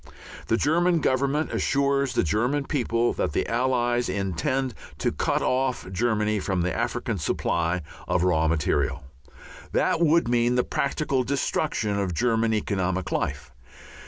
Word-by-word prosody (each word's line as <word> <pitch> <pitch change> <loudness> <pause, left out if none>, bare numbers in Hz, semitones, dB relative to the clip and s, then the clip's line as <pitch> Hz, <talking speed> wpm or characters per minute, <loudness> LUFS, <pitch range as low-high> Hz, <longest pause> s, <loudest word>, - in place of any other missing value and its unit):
The 115 - +2
German 170 +4 +2
Government 140 +2 0
assures 140 -1 +1
the - - +2
German 120 - 0
people 120 -5 0
that 75 - -2
the - - 0
Allies 120 -1 +1
intend 100 - -1 0.2
to - - 0
cut - - 0
off 130 0 0
Germany 105 +1 +1
from 95 -2 -1
the 90 -1 -1
African - - -2
supply 85 0 -1 0.2
of 90 - +1
raw 80 -3 +2
material. 75 -2 0 0.7
That 165 - +1
would 165 -2 +4
mean 120 0 +2
the 125 - +3
practical 140 -2 -1
destruction 125 -5 -1
of 95 -4 -2
German 115 +2 +1
economic 95 -4 -1
life. 70 - -2
120 Hz, 135 wpm, -25 LUFS, 95-135 Hz, 0.7 s, would